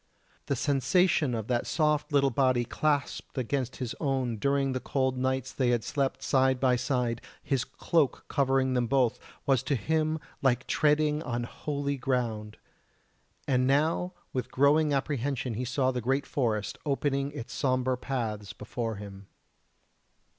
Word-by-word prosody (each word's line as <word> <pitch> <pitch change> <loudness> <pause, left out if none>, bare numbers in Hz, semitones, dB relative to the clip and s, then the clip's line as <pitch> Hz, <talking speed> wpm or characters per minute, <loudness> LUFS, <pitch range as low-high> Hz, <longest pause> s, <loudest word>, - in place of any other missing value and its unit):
The 140 - +1
sensation 145 +1 +2
of 110 -2 -3
that 120 -1 0
soft 150 -2 +1
little 140 -2 +3
body 130 -1 +2
clasped 145 +2 -1
against 130 0 -1
his 125 -3 -4
own 130 -5 0
during 140 +3 +1
the 130 - -1
cold 130 0 0
nights 130 0 -1
they 130 -3 +1
had 120 -2 +1
slept 140 -2 -1
side 130 -1 +3
by 125 -1 +3
side, 125 -2 -1 0.2
his 135 -4 0
cloak 160 -3 0
covering 135 -2 +2
them 125 -2 +1
both, 125 -2 +2 0.3
was 135 -4 +3
to 135 +2 0
him 155 +6 0 0.2
like 130 -2 +2
treading 150 0 +2
on 120 -4 -2
Holy 140 +3 -3
ground! 115 -5 -2 0.9
And 130 -1 +2
now 160 +6 +2 0.2
with 130 - -2
growing 145 +3 +3
apprehension 135 -3 -1
he 125 +4 -3
saw 130 +1 +1
the 125 -1 -3
great 135 +4 0
forest 110 -7 -1
opening 140 -1 0
its 140 -6 -7
sombre 130 -2 +1
paths 115 -6 -3
before 115 +1 -4
him. 100 -1 -10
130 Hz, 145 wpm, -29 LUFS, 120-140 Hz, 0.9 s, little